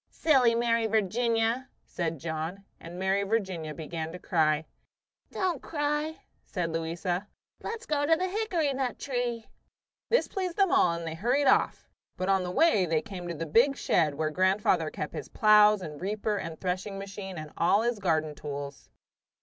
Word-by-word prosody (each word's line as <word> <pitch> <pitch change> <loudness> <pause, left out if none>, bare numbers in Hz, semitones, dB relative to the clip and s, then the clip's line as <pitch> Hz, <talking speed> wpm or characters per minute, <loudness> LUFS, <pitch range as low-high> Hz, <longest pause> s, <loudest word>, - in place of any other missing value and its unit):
"Silly 260 -7 +3
Mary 230 -1 +2
Virginia!" 225 +4 +1 0.2
said 165 -2 -3
John, 160 +6 -5
and 170 +1 -9
Mary 190 +1 +1
Virginia 190 -7 -2
began 160 +1 -5
to 180 - -7
cry. 160 -3 +1 0.6
"Don't 360 -7 -1
cry," 295 +1 -2 0.2
said 175 -4 -3
Louisa. 175 +4 -2 0.3
"Let's 455 +1 -5
go 290 -4 0
to 325 - +5
the 365 +3 -1
hickory 365 -8 0
nut 260 -2 -2
tree." 245 -4 -2 0.6
This 485 - +3
pleased 370 -2 -3
them 390 -3 +3
all, 170 - +4
and 170 0 -5
they 160 - -4
hurried 245 - +1
off; 265 - +2 0.3
but 185 +1 -2
on 195 -1 +3
the 180 - -3
way 200 - +3
they 160 -1 +1
came 190 -5 -7
to 170 - -4
the 165 - -4
big 245 - +3
shed 150 -4 +2
where 155 +1 -1
grandfather 185 -2 +2
kept 150 - -5
his - - -6
plows 210 -2 +5
and 150 -2 -8
reaper 210 +2 -1
and 165 -5 -5
threshing 185 +2 -3
machine 195 -1 -7
and 155 -1 -7
all 200 +6 +3
his 240 -2 0
garden 155 -5 0
tools. 140 -2 -7
195 Hz, 170 wpm, -28 LUFS, 165-245 Hz, 0.6 s, to